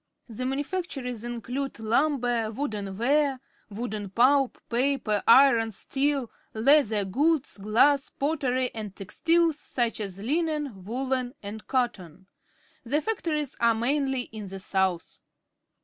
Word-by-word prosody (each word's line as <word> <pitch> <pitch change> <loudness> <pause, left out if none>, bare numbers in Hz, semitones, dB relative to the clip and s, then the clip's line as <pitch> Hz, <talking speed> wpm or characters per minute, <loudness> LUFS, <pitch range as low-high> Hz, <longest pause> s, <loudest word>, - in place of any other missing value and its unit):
The 255 +2 -4
manufactures 270 - -3
include 245 +3 -4
lumber, 240 -1 +1
wooden 210 -6 -4
w^are, 275 +3 +2 0.3
wood 210 -2 -5
pulp, 270 +2 +3
paper, 240 -4 +1
iron, 235 -3 +6
steel, 275 +3 -1 0.2
leather 225 -4 +4
goods, 285 - 0
glass, 255 +8 +3
pottery, 265 -4 -1
and 210 -3 -6
textiles 325 - +1
such 240 -6 -2
as 195 -3 -5
Unens, 300 +4 -1
woollens, 250 +6 -3
and 210 +2 -8
cottons. 195 - -2 0.6
The 280 +5 +1
factories 310 - -2
are 235 -1 +4
mainly 265 +2 0
in 220 -4 -8
the 195 +1 -7
south. 190 -2 -1
245 Hz, 115 wpm, -27 LUFS, 215-280 Hz, 0.6 s, iron